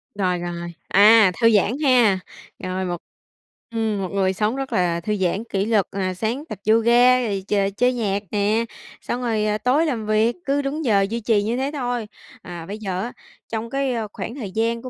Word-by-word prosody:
Rồi, 185 Hz, -3 st, 0 dB
rồi, 175 Hz, 0 st, -5 dB
à, 210 Hz, 0 st, +6 dB
thư 230 Hz, -, +6 dB
giãn 210 Hz, 0 st, +3 dB
ha. 240 Hz, -8 st, +4 dB, 0.4 s
Rồi 185 Hz, 0 st, -2 dB
một 175 Hz, -1 st, -2 dB, 0.7 s
ừm, 220 Hz, -3 st, -1 dB
một 185 Hz, -, -3 dB
người 190 Hz, -1 st, +1 dB
sống 215 Hz, +5 st, 0 dB
rất 270 Hz, 0 st, -4 dB
là 175 Hz, -2 st, +1 dB
thư 210 Hz, +4 st, -1 dB
giãn, 190 Hz, +3 st, -1 dB
kỷ 195 Hz, 0 st, 0 dB
luật, 215 Hz, -4 st, +2 dB
à, 185 Hz, -1 st, -2 dB
sáng 225 Hz, +9 st, -2 dB
tập 210 Hz, -, -5 dB
yoga, 240 Hz, +3 st, +5 dB
rồi 200 Hz, -5 st, -2 dB
ch -, -, -2 dB, 0.2 s
chơi 250 Hz, +1 st, +3 dB
nhạc 205 Hz, -4 st, -1 dB
nè, 210 Hz, +2 st, +1 dB, 0.4 s
xong 245 Hz, -, -3 dB
rồi, 220 Hz, -3 st, 0 dB
ờ, 210 Hz, 0 st, +1 dB
tối 275 Hz, +8 st, +2 dB
làm 235 Hz, -8 st, -2 dB
việc. 215 Hz, +2 st, +2 dB
Cứ 280 Hz, +1 st, +1 dB
đúng 285 Hz, +2 st, -3 dB
giờ 200 Hz, -4 st, +4 dB
duy 230 Hz, +1 st, -2 dB
trì 215 Hz, -2 st, +1 dB
như 230 Hz, +3 st, -1 dB
thế 270 Hz, +2 st, -1 dB
thôi. 245 Hz, -5 st, -2 dB, 0.3 s
À, 175 Hz, -2 st, -8 dB
bây 205 Hz, +3 st, -6 dB
giờ 190 Hz, -3 st, -3 dB
á, 240 Hz, -, -5 dB, 0.4 s
trong 225 Hz, +1 st, -3 dB
cái, 275 Hz, -1 st, -1 dB
ơ, 225 Hz, -2 st, -2 dB
khoảng 235 Hz, -, -6 dB
thời 210 Hz, -9 st, -6 dB
gian 230 Hz, +2 st, -1 dB
của 255 Hz, -, -7 dB
220 Hz, 210 wpm, -22 LUFS, 195-240 Hz, 0.7 s, à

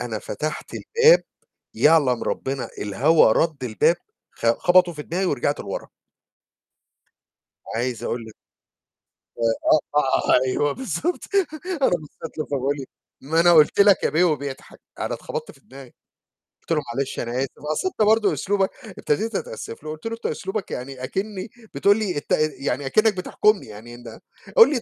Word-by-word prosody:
أنا -, -, -3 dB
فتحت -, -, -5 dB
الباب، 465 Hz, +2 st, +4 dB, 0.5 s
يعلم 145 Hz, -6 st, +4 dB
ربنا 135 Hz, -1 st, -3 dB
الهوا 120 Hz, +6 st, +4 dB
رد 155 Hz, -1 st, 0 dB
الباب 125 Hz, +9 st, +2 dB, 0.4 s
خ -, -, -5 dB
خبطه 180 Hz, -1 st, +4 dB
في 150 Hz, -, -7 dB
دماغي 180 Hz, +5 st, -2 dB
ورجعت 145 Hz, -4 st, 0 dB
لورا. -, -, -6 dB, 1.9 s
عايز 120 Hz, 0 st, -2 dB
أقول 120 Hz, -, -2 dB
لك 110 Hz, -, -12 dB, 1.0 s
ف -, -, -22 dB, 0.6 s
آه، -, -, +7 dB
آه، 130 Hz, -2 st, +3 dB
أيوه 145 Hz, +3 st, +1 dB
بالضبط 280 Hz, -, -3 dB, 0.6 s
أنا -, -, +4 dB
بصيت 160 Hz, -1 st, -5 dB
له 155 Hz, -, -1 dB
فبيقول 140 Hz, 0 st, -1 dB
لي:"ما 140 Hz, +3 st, -4 dB
أنا 175 Hz, +1 st, +6 dB
قُلت 155 Hz, +3 st, +5 dB
لك 200 Hz, -1 st, +6 dB
يا -, -, +2 dB
بيه" 160 Hz, +5 st, +3 dB
وبيضحك. 140 Hz, -5 st, -3 dB, 0.2 s
أنا -, -, -2 dB
اتخبطت -, -, -6 dB
في -, -, -23 dB
دماغي، 135 Hz, -1 st, -14 dB, 0.7 s
قُلت -, -, -10 dB
له: 155 Hz, -2 st, +2 dB
"معلش 135 Hz, -1 st, -2 dB
أنا 120 Hz, -, -3 dB
آسف 135 Hz, -, 0 dB, 0.2 s
أصل 375 Hz, -, -1 dB
أنت 365 Hz, -, -4 dB
برضو 220 Hz, -1 st, +3 dB
أسلوبك"، 195 Hz, -1 st, 0 dB, 0.3 s
ابتديت 220 Hz, +9 st, -1 dB
أتأسف 115 Hz, -, -6 dB
له، 155 Hz, -, -6 dB
قُلت 155 Hz, +5 st, -10 dB
له: 225 Hz, -, -2 dB
"أنت 230 Hz, -, -17 dB
أسلوبك 195 Hz, +1 st, -3 dB
يعني 130 Hz, +1 st, -6 dB
أكنّي 195 Hz, -, -4 dB, 0.2 s
بتقول 200 Hz, +1 st, +4 dB
لي 200 Hz, -7 st, -2 dB
الت 145 Hz, -, -6 dB, 0.3 s
يعني 135 Hz, 0 st, -2 dB
أكنّك 215 Hz, +8 st, +3 dB
بتحكمني، 210 Hz, +3 st, +1 dB
يعني 110 Hz, +3 st, -11 dB
إن 115 Hz, -2 st, -11 dB, 0.4 s
قُل 460 Hz, -, +9 dB
لي 260 Hz, -5 st, 0 dB
155 Hz, 155 wpm, -23 LUFS, 130-195 Hz, 1.9 s, قُل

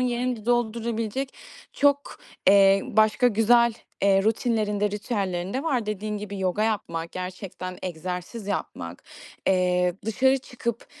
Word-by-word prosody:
yerini 245 Hz, -2 st, -1 dB
doldurabilecek 235 Hz, +1 st, -1 dB, 0.4 s
çok, 285 Hz, 0 st, +1 dB, 0.3 s
eee, 195 Hz, 0 st, +6 dB
başka 220 Hz, +3 st, +3 dB
güzel, 235 Hz, +2 st, +4 dB, 0.3 s
eee, 195 Hz, -1 st, +4 dB
rutinlerin 215 Hz, -1 st, 0 dB
de, 210 Hz, 0 st, +2 dB
ritüellerin 195 Hz, -4 st, -2 dB
de 265 Hz, -, -1 dB
var. 255 Hz, -9 st, 0 dB
Dediğin 210 Hz, 0 st, -3 dB
gibi 200 Hz, -1 st, -6 dB
yoga 190 Hz, +2 st, 0 dB
yapmak, 170 Hz, -7 st, -2 dB
gerçekten 185 Hz, 0 st, -6 dB
egzersiz 180 Hz, +5 st, -5 dB
yapmak, 85 Hz, -, -4 dB, 0.4 s
eee, 180 Hz, -1 st, +2 dB
dışarı 265 Hz, +5 st, +3 dB
çıkıp 240 Hz, -3 st, -5 dB
210 Hz, 120 wpm, -25 LUFS, 185-235 Hz, 0.4 s, eee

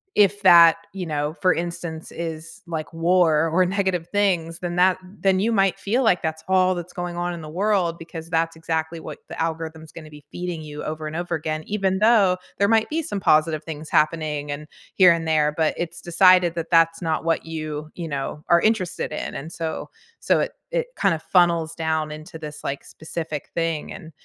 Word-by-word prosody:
if 205 Hz, 0 st, +4 dB
that, 170 Hz, -3 st, +8 dB, 0.2 s
you 190 Hz, -2 st, -4 dB
know, 150 Hz, 0 st, -2 dB
for 185 Hz, -1 st, +4 dB
instance, 170 Hz, -1 st, -5 dB
is, 165 Hz, +3 st, -6 dB
like, 160 Hz, -2 st, -4 dB
war 165 Hz, -2 st, +3 dB
or 185 Hz, +3 st, +3 dB
negative 185 Hz, -3 st, -1 dB
things, 175 Hz, -5 st, 0 dB
then 175 Hz, -1 st, -4 dB
that 180 Hz, +1 st, +4 dB
then 190 Hz, 0 st, 0 dB
you 225 Hz, +3 st, +1 dB
might 195 Hz, -3 st, +2 dB
feel 240 Hz, +6 st, 0 dB
like 185 Hz, -6 st, +3 dB
that's 160 Hz, 0 st, -3 dB
all 185 Hz, 0 st, +3 dB
that's 175 Hz, 0 st, -6 dB
going 175 Hz, -1 st, -5 dB
on 175 Hz, 0 st, -2 dB
in 170 Hz, -, -6 dB
the 155 Hz, -, -8 dB
world 185 Hz, -1 st, 0 dB
because 165 Hz, 0 st, -9 dB
that's 165 Hz, -1 st, 0 dB
exactly 160 Hz, 0 st, -2 dB
what -, -, -8 dB
the -, -, -5 dB
algorithm's 160 Hz, -1 st, -4 dB
gonna 155 Hz, -2 st, -10 dB
be 150 Hz, -1 st, -14 dB
feeding 175 Hz, -2 st, -4 dB
you 150 Hz, -1 st, -7 dB
over 155 Hz, 0 st, -4 dB
and 155 Hz, -, -6 dB
over 175 Hz, 0 st, -3 dB
again. 155 Hz, 0 st, -3 dB
Even 195 Hz, -2 st, 0 dB
though 210 Hz, -4 st, +4 dB, 0.2 s
there 200 Hz, -, +3 dB
might 225 Hz, 0 st, +3 dB
be 325 Hz, +2 st, -1 dB
some 205 Hz, -, -4 dB
positive 155 Hz, -1 st, +3 dB
things 155 Hz, -1 st, -7 dB
happening 150 Hz, -2 st, 0 dB
and 150 Hz, +1 st, -6 dB, 0.3 s
here 185 Hz, -3 st, +7 dB
and 165 Hz, -1 st, -3 dB
there, 150 Hz, -1 st, +2 dB
but 160 Hz, -1 st, +1 dB
it's 170 Hz, 0 st, -4 dB
decided 175 Hz, 0 st, +5 dB
that, 165 Hz, -1 st, -4 dB
that's 165 Hz, +1 st, +4 dB
not 160 Hz, -1 st, -1 dB
what 165 Hz, -1 st, 0 dB
you, 155 Hz, -1 st, -5 dB
you 170 Hz, -3 st, -5 dB
know, 140 Hz, +1 st, -4 dB
are 170 Hz, 0 st, +6 dB
interested 200 Hz, -8 st, 0 dB
in, -, -, -4 dB
and 155 Hz, +4 st, -6 dB
so 160 Hz, -1 st, -4 dB, 0.3 s
so -, -, +2 dB
it -, -, -2 dB, 0.2 s
it -, -, -1 dB
kind 195 Hz, -3 st, +3 dB
of 155 Hz, -, -8 dB
funnels 170 Hz, -3 st, +2 dB
down 160 Hz, -1 st, -1 dB
into 155 Hz, +1 st, -9 dB
this, 150 Hz, -1 st, -8 dB
like, 140 Hz, -, -3 dB
specific 160 Hz, -2 st, -6 dB
thing, 165 Hz, -2 st, -2 dB
and 165 Hz, -4 st, -10 dB
165 Hz, 205 wpm, -23 LUFS, 160-185 Hz, 0.3 s, that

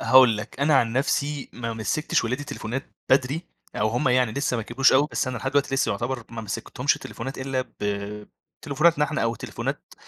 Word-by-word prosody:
هاقول 130 Hz, -4 st, +7 dB
لك، 110 Hz, +5 st, -7 dB
أنا 150 Hz, +1 st, +4 dB
عن 115 Hz, -3 st, +2 dB
نفسي 140 Hz, +2 st, 0 dB
ما 115 Hz, -1 st, -4 dB
مسِّكتش 115 Hz, +6 st, 0 dB
ولادي 130 Hz, +5 st, -2 dB
تليفونات 125 Hz, +3 st, -4 dB, 0.3 s
بدري، 135 Hz, +5 st, +3 dB, 0.3 s
أو 110 Hz, +1 st, +2 dB
هم 120 Hz, +3 st, +1 dB
يعني 125 Hz, -3 st, +3 dB
لسّه 140 Hz, -2 st, 0 dB
ما 115 Hz, -, -2 dB
كبروش 130 Hz, +4 st, +3 dB
أوي، 140 Hz, +3 st, +4 dB
بس 130 Hz, -, 0 dB
أنا 125 Hz, -2 st, -3 dB
لحد 135 Hz, +3 st, -2 dB
دلوقتي 140 Hz, -1 st, +1 dB
لسّه 135 Hz, -, +2 dB
يعتبر 120 Hz, +3 st, -3 dB
ما 115 Hz, -1 st, -5 dB
مسِّكتهمش 125 Hz, +6 st, -1 dB
تليفونات 135 Hz, +1 st, -7 dB
إلا 130 Hz, -1 st, -1 dB, 0.2 s
ب 105 Hz, 0 st, -3 dB, 0.4 s
تليفوناتنا 150 Hz, +1 st, +3 dB
إحنا، 155 Hz, 0 st, -1 dB
أو 115 Hz, 0 st, +1 dB
تليفونات -, -, -5 dB
130 Hz, 190 wpm, -25 LUFS, 115-140 Hz, 0.4 s, هاقول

